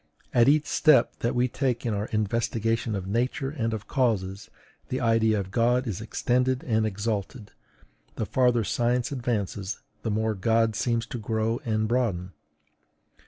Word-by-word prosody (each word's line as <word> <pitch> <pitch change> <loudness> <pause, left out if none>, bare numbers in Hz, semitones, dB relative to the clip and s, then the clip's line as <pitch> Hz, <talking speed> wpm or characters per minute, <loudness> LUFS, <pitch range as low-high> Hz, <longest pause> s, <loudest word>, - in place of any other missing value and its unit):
At 120 +1 +5
each 150 +1 +3
step 155 -3 +4
that 120 - -1
we 125 +1 +3
take 125 -2 -1
in 115 - 0
our 105 +1 -2
investigation 115 +1 -1
of 95 -2 -4
Nature 125 +6 -1
and 115 -6 -2
of 105 -3 -5
causes, 105 -6 -1 0.4
the 130 - -1
idea 115 -3 +2
of 95 -1 -5
God 120 +3 +2
is 105 -4 -4
extended 125 +3 0
and 110 -2 +1
exalted; 105 +2 -3 0.6
the - - -2
farther 125 -3 +2
science 120 +4 0
advances, 110 -6 -2 0.2
the 115 - -2
more 110 +1 0
God 110 +2 +1
seems 115 +1 0
to 120 - -6
grow 110 +1 -1
and 110 -1 0
broaden. 105 -7 0
115 Hz, 155 wpm, -26 LUFS, 110-125 Hz, 0.6 s, At